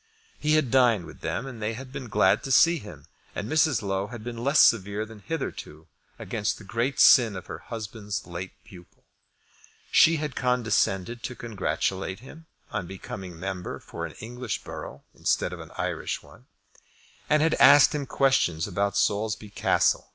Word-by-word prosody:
He 150 0 +1
had 145 -6 +1
dined 120 -8 +4
with - - -12
them, - - -3
and 125 -5 -8
they 105 +2 -1
had 130 +3 -9
been 135 -2 -6
glad 100 0 +3
to 135 - -3
see 170 +5 +5
him, 85 - -12 0.3
and 100 - -4
Mrs. 155 -6 +2
Low 95 0 -1
had 115 -1 -9
been 120 0 -6
less 140 +2 +3
severe 105 -1 +4
than 110 -1 -12
hitherto 95 - -6 0.3
against 110 -2 -2
the - - -12
great 115 +7 -2
sin 115 -6 +7
of 95 - -7
her 80 - -7
husband's 105 -2 -6
late 85 +2 -7
pupil. 90 -2 -16 0.9
She 165 0 +6
had 150 -3 -4
condescended 115 -3 0
to 125 - -5
congratulate 95 -3 -3
him 160 +5 -13 0.2
on 105 -5 -3
becoming 95 -2 -8
member 95 0 -5
for 85 0 -6
an 80 - -12
English 120 0 -6
borough - - -8
instead - - 0
of - - -7
an - - -10
Irish - - -3
one, - - -18 0.8
and 150 0 +4
had 160 0 +2
asked 145 +2 +8
him 145 -2 -3
questions 120 - +2
about 100 +1 -1
Saulsby 105 0 0
Castle. - - +1
110 Hz, 170 wpm, -26 LUFS, 95-130 Hz, 0.9 s, asked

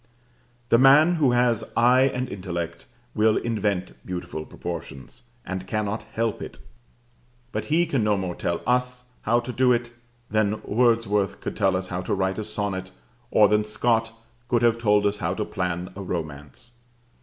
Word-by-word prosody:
The 115 - +5
man 150 +6 +6
who 140 -6 +3
has 120 -2 +2
eye 125 +3 +5
and 125 0 -3
intellect 85 -5 -5 0.3
will 110 0 +3
invent 105 -5 -1
beautiful 90 -4 -5
proportions, 80 -6 -7 0.2
and 95 0 -5
cannot 105 +1 -2
help 115 -1 -1
it; - - -8 0.9
but - - -3
he 165 +3 +2
can 135 -8 0
no 105 -1 +2
more 95 -2 -3
tell 85 0 -2
us 125 0 0 0.2
how 120 +2 +2
to 125 +1 -6
do 130 0 +3
it 120 -1 0 0.4
than 110 0 +1
Wordsworth 115 -4 +1
could - - -5
tell 95 -2 +2
us 95 0 -3
how 90 0 -3
to 90 - -1
write 95 +1 -1
a - - -2
sonnet, 100 -3 -3 0.4
or 105 - +6
than 105 +1 +2
Scott 115 +1 0 0.4
could 120 -1 +1
have 115 -1 +3
told 105 -2 +3
us 100 +1 0
how - - -1
to - - -2
plan 90 0 -3
a 100 - -6
romance. 80 - -6
105 Hz, 165 wpm, -24 LUFS, 95-120 Hz, 0.9 s, man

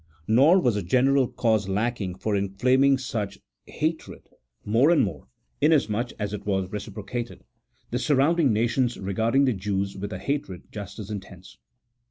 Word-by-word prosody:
Nor 140 - +5
was 125 - +1
a 105 - -1
general 130 +7 +3
cause 110 -5 0
lacking 105 -2 -1
for 105 +2 -2
inflaming 125 +8 +3
such 105 -6 -4 0.3
hatred 160 +1 -4 0.4
more 115 +8 +4
and 165 -6 +4
more, 75 -10 -5 0.3
inasmuch 125 -7 +2
as 105 -1 -3
it 105 - -5
was 95 -2 -1
reciprocated; 105 +3 -6 0.5
the 125 - -1
surrounding 145 +1 +3
nations 120 +3 +1
regarding 110 +8 +1
the 130 - +2
Jews 100 0 -2
with 100 +1 -5
a - - -4
hatred 140 -11 -3
just 100 -3 -8
as 105 -1 -7
intense. 95 -2 -9
110 Hz, 150 wpm, -25 LUFS, 100-130 Hz, 0.5 s, Nor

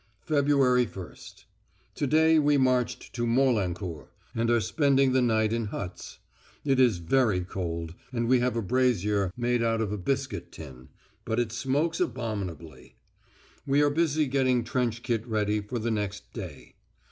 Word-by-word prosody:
"Feb. 145 -3 +1
1st. 125 -9 0 0.5
To 145 - -2
day 160 +2 +4
we 145 -1 +3
marched 125 -2 0
to 120 -1 -1
Morlancourt 100 - 0 0.3
and 115 +1 0
are 120 0 +4
spending 135 +2 +2
the 130 0 +3
night 110 -2 +2
in 115 -1 -1
huts. 100 -3 -7 0.5
It 135 -2 +2
is 125 -7 +4
very 100 +2 +2
cold, 85 -3 -4 0.2
and 115 -2 -1
we 125 +1 +4
have 125 -1 0
a 115 - -1
brazier 105 -5 +1
made 120 0 +1
out 115 -1 +1
of 110 -3 -1
a 105 - -3
biscuit 130 -6 -3
tin, 65 -5 -11 0.3
but 110 +1 -1
it 120 -2 -1
smokes 140 +7 -1
abominably. 100 - -4 0.7
We 140 +2 +3
are 145 - +3
busy 155 0 +1
getting 130 -2 +1
trench 120 0 -2
kit 115 -3 -1
ready 105 -1 0
for 105 +4 -5
the 115 0 -1
next 105 -2 -4
day. 90 - -8
120 Hz, 160 wpm, -27 LUFS, 105-130 Hz, 0.7 s, day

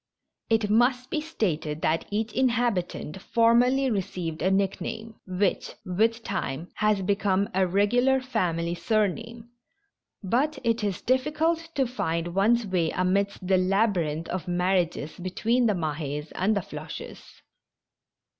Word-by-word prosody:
It 225 -2 +2
must 245 +4 +2
be 305 - 0
stated 165 - -2
that 160 +1 +1
each 215 +1 -2
inhabitant 235 -9 0
formerly 245 +4 +3
received 180 -5 -3
a 185 - +2
nickname, 210 +3 -1
which, 185 +1 -1
with 225 +5 +1
time, 175 -5 -3
has 210 -2 +2
become 200 0 +1
a 190 0 +2
regular 245 +8 +3
family 170 -10 -1
surname, 225 +3 -1 0.7
but 260 +11 +1
it 230 -1 +1
is 200 -3 -2
dif 255 +2 +2
ficult 325 +2 0
to 270 - +2
find 170 -9 -2
one's 225 +5 +3
way 180 -4 0
amidst 190 +2 0
the 185 0 +3
labyrinth 185 -5 +1
of 180 -2 -4
mar 180 +1 +1
riages 175 -2 -1
between 230 +7 +1
the 210 - +2
Mahes 150 -2 -3
and 205 +2 +1
the - - 0
Floches. 200 - -8
200 Hz, 135 wpm, -26 LUFS, 180-235 Hz, 0.7 s, formerly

